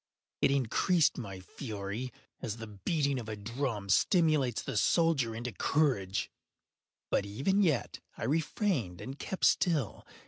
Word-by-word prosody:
It - - +5
increased 140 - +2
my 100 -5 -6
fury, 105 +3 -5 0.3
as 115 -3 -3
the 115 - -6
beating 135 - -1
of 115 -2 -7
a 110 - -3
drum 115 0 -3
stimulates 150 - +3
the - - -4
soldier 135 -2 +2
into 120 +2 -4
courage. 105 -11 +1 0.8
But - - +2
even 140 - +1
yet 155 -10 +1 0.2
I - - -5
refrained 150 - 0
and 135 +2 -7
kept 190 - -1
still. 160 - +2
125 Hz, 135 wpm, -31 LUFS, 105-155 Hz, 0.8 s, It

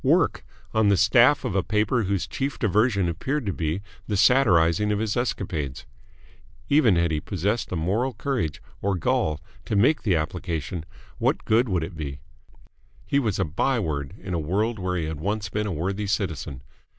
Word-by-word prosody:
Work! - - +2 0.3
on 110 -2 +3
the 100 - +4
staff 120 +8 +5
of 120 - -1
a 95 - +2
paper 105 +3 +1
whose 100 0 0
chief 140 +1 -3
diversion 105 -2 +2
appeared 130 - -2
to 100 - -1
be 80 +4 -2 0.2
the 105 - 0
satirising 105 -5 +4
of 105 - +1
his 110 0 -1
escapades! 80 - -2 0.8
Even 135 -9 +5
had 85 -1 +2
he 75 - 0
possessed 100 +6 -1
the - - -3
moral 105 +10 0
courage 105 - -2 0.2
or 100 -1 +1
gall 75 -2 0 0.3
to 110 - -2
make 125 +10 +4
the 95 -6 +2
application, 80 -1 -3 0.3
what - - 0
good 115 +2 +3
would 90 -4 0
it 85 +2 -6
be? 70 -3 -5 0.9
He 140 - +2
was 110 -8 0
a 95 - +1
by 115 - 0
word 70 -8 -3
in 95 - -6
a 85 - 0
world 105 +8 -1
where 90 -1 -1
he 80 - -1
had 80 -1 -4
once 105 +5 -2
been 105 0 -2
a - - -2
worthy 95 +5 -2
citizen. 80 - -2
100 Hz, 185 wpm, -25 LUFS, 80-110 Hz, 0.9 s, staff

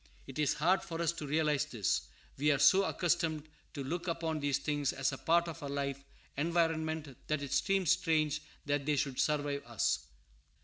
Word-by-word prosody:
It 135 +2 -8
is 150 -2 +2
hard 180 +6 +3
for 165 -2 -6
us 170 -1 +2
to 160 -3 -6
realize 150 -1 +2
this. 115 -10 -1 0.3
We 150 +2 +2
are 140 - +3
so 190 +8 +6
accustomed 165 -4 0 0.3
to 140 - -3
look 170 +6 -3
upon 165 -2 -1
these 145 -2 +1
things 145 -2 -1
as 135 0 0
a 135 - -5
part 170 +1 +3
of 165 - -7
our 140 - -5
life 140 -1 -3 0.3
environment 160 -2 0
that 155 -1 -1
it 140 - -6
seems 195 -3 +2
strange 155 -4 +2 0.2
that 145 0 -1
they 150 - +3
should 135 -2 -1
survive 145 -2 0
us. 120 -3 +1
150 Hz, 185 wpm, -33 LUFS, 140-165 Hz, 0.3 s, so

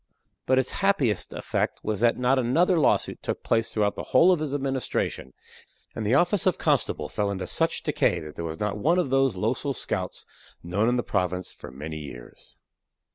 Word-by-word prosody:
But 130 - +4
its 130 -1 +1
happiest 145 - +1
effect - - -2
was 105 -2 -2
that 120 +1 +3
not 125 +2 +2
another 165 +9 +3
lawsuit 150 - +1
took - - -4
place 115 -1 +1
throughout 105 -2 0
the - - -6 0.2
whole 180 +7 +7
of 180 - +2
his 155 -2 -3
administration; 135 - -2 0.6
and 110 - -4
the 120 - +3
office 175 +5 +3
of 185 - +2
constable - - 0
fell 105 -1 -1
into 95 -2 -3
such - - -1
decay - - +1
that 75 -1 -9
there - - -5
was 80 -1 -5
not 105 0 -2
one 165 - +2
of 175 -8 0
those 135 -4 +3
losel 125 +8 -1
scouts - - -4 0.4
known 100 +7 +1
in 125 - +1
the 120 - 0
province 90 -2 -2
for - - -11
many 75 +4 -7
years. 70 -5 -11
120 Hz, 190 wpm, -26 LUFS, 95-140 Hz, 0.6 s, whole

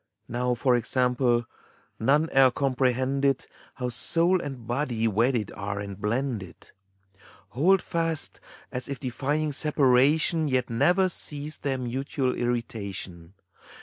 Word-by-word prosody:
Now, 125 +1 -1
for 125 +1 +2
example, 125 0 +1 0.5
none 145 +7 +2
e'er 135 -1 +7
comprehended 135 +1 0 0.3
How 125 -2 -3
soul 170 +9 +3
and 135 -6 -7
body 120 -2 -1
wedded 115 +1 0
are 100 0 -4
and 100 -1 -7
blended, 115 -4 -3 0.4
— 95 +1 -25
Hold 175 +8 +2
fast, 165 -2 +1 0.3
as 125 +1 -3
if 140 - -4
defying 145 +3 -2
separation 150 +3 +3
Yet 130 -3 0
never 180 +11 +3
cease 150 -3 -3
their 135 -2 -2
mutual 130 +1 -2
irritation. 100 -7 -4
130 Hz, 115 wpm, -26 LUFS, 120-145 Hz, 0.5 s, e'er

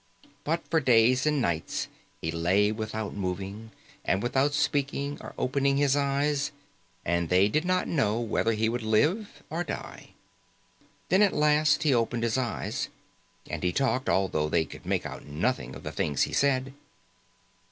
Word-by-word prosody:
But 165 +3 -2
for 160 - +2
days 125 0 +4
and 150 -1 +2
nights 85 -9 -1 0.3
he 80 - -2
lay 90 +5 +2
without 110 -1 -4
moving 100 +3 -4 0.3
and 95 +2 0
without 135 +4 +1
speaking 140 0 -1
or - - -9
opening 140 +1 +1
his 140 -1 +3
eyes, 145 +1 +1 0.6
and 85 -1 0
they 95 +2 +5
did 155 +10 0
not 185 0 +1
know 115 -8 +1
whether 115 0 0
he 110 +1 +1
would 120 +2 -1
live 150 - 0
or 170 +2 -1
die. - - -7 0.9
Then, 190 +4 +4
at 205 -2 +4
last, 150 0 +3
he 150 -3 +3
opened 115 0 0
his 115 -1 +1
eyes. 125 -2 -3 0.6
And - - -4
he 90 - +1
talked, 130 +3 0
although 85 -4 +1
they 80 0 +2
could - - -12
make - - 0
out - - -7
nothing 75 - -2
of - - -10
the - - -4
things 75 -2 0
he - - -3
said. 135 -1 +1
125 Hz, 165 wpm, -28 LUFS, 100-145 Hz, 0.9 s, they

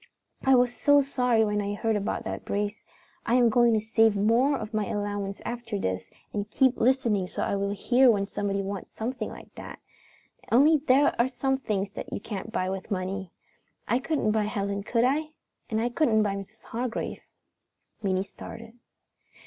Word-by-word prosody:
I 265 0 +5
was 245 -1 +3
so 285 +4 +4
sorry 250 -4 +2
when 210 0 0
I 205 0 -2
heard 225 +1 0
about 205 -1 -2
that - - -5
brace. 205 +2 -2 0.4
I 235 - +1
am 245 -2 +5
going 240 +1 +4
to - - +3
save 225 0 +3
more 235 +8 +3
of 215 - -7
my 215 -2 0
allowance 205 -1 -3
after 235 -3 -4
this 95 - -3 0.2
and 205 0 -3
keep 260 +1 +3
listening 230 -6 +2
so - - -3
I - - 0
will 200 0 -1
hear 245 +6 +4
when 200 -3 +3
somebody 200 0 -2
wants 195 -1 -6
something 235 0 -3
like - - -12
that. - - -9 0.7
Only 295 +6 +6
there 280 0 +3
are 240 - +2
some 265 +1 -1
things 200 -6 -2
that - - -7
you - - -3
can't 205 0 -6
buy 185 -5 -1
with 190 +1 -4
money. 190 -2 -3 0.6
I 245 - +2
couldn't 275 -6 0
buy 215 -1 +1
Helen, 200 -1 -2
could 230 +3 +1
I? 305 +4 +1 0.4
And 220 - 0
I 235 +2 +1
couldn't 235 -5 +2
buy 205 -2 0
Mrs. 200 +2 -9
Hargrave." 235 0 -4 0.8
Minnie 190 -2 0
started. 225 +3 -10
220 Hz, 180 wpm, -27 LUFS, 200-245 Hz, 0.8 s, Only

